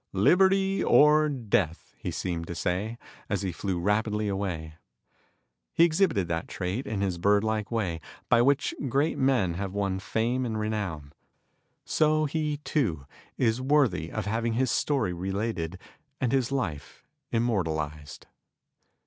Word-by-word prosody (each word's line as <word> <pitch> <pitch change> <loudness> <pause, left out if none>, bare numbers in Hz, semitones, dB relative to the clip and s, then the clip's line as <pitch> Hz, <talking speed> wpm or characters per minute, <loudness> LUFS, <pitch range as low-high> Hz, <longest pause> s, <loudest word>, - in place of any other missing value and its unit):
"Liberty 190 - +3
or 150 +1 +5
death," 100 - -1
he - - -5
seemed 85 -3 -3
to 85 - -5
say, 100 +8 -2 0.3
as - - -1
he 95 - -1
flew 90 +1 -3
rapidly 105 +3 0
away. 90 -6 -3 1.0
He 165 - +6
exhibited 160 - +2
that 80 0 -2
trait, 95 +8 -3
in 105 -3 -2
his 95 -3 -1
bird 100 +3 +3
like 110 -1 -1
way, 95 -8 -2 0.3
by 120 - +5
which 140 +3 +2 0.2
great 140 +6 +1
men 125 -10 +2
have 95 +2 -4
won 100 -2 -1
fame 115 +6 -1
and 110 -3 -2
renown, 100 -10 -3 0.7
so 155 0 +2
he, 150 0 -1
too, 90 - -1 0.3
is 115 0 +1
worthy 130 - +2
of 110 -2 -3
having 115 +2 -1
his 125 0 +1
story 130 -5 +1
related 95 -1 -3 0.4
and 125 -4 0
his 135 -2 +1
life 85 - -4 0.3
immortalized. 80 -10 -2
105 Hz, 140 wpm, -27 LUFS, 90-130 Hz, 1.0 s, He